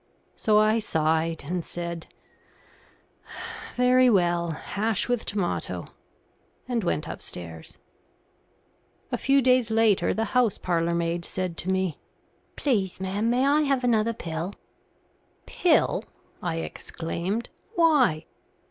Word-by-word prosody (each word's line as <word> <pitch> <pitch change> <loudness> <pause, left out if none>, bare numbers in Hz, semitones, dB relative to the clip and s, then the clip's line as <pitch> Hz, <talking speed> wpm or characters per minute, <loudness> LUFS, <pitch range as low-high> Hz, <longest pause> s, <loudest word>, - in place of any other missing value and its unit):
So 215 -1 +3
I 215 +1 +4
sighed, 160 -4 0
and 175 +3 -2
said 170 -1 -5 1.7
"Very 250 0 +5
well, 175 -4 +2
hash 205 +6 -1
with 245 -2 -1
tomato," 200 -4 -2 0.8
and 240 -3 -1
went 155 -3 -1
upstairs. 80 - -7 1.3
A - - 0
few 275 0 +3
days 255 -2 +4
later 220 -3 +3
the 225 - 0
house 245 -5 +3
parlourmaid 170 0 0
said 185 0 -3
to 185 - -4
me, 190 -4 0 0.6
"Please, 200 -11 0
ma'am, 195 +4 -1
may 250 +3 +2
I 290 +2 +4
have 275 -3 +1
another 230 -2 +2
pill?" 170 -1 -5 0.9
"Pill!" 345 -3 +2 0.4
I 170 -2 -2
exclaimed. 170 +6 -4 0.2
"Why?" 285 - +4
200 Hz, 110 wpm, -26 LUFS, 170-240 Hz, 1.7 s, Very